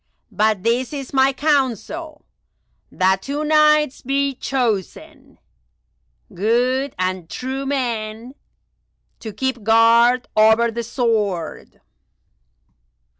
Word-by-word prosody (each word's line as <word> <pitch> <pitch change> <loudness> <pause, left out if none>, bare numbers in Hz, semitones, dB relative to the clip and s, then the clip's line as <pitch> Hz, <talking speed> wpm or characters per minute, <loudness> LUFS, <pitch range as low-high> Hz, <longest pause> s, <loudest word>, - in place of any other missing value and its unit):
But 210 -1 0
this 240 +4 0
is 275 -2 -7
my 265 0 +4
counsel—that 275 - -3
two 285 +5 -4
Knights 305 -2 +3
be 275 +1 -1
chosen, 240 -7 -4 1.0
good 250 +7 0
and 185 -2 -3
true 265 +2 -5
men, 235 -3 -3 0.9
to 220 - -7
keep 255 +3 -3
guard 230 +3 +4
over 220 +2 +4
the 235 +1 -4
sword." 220 - -3
240 Hz, 85 wpm, -20 LUFS, 220-275 Hz, 1.0 s, my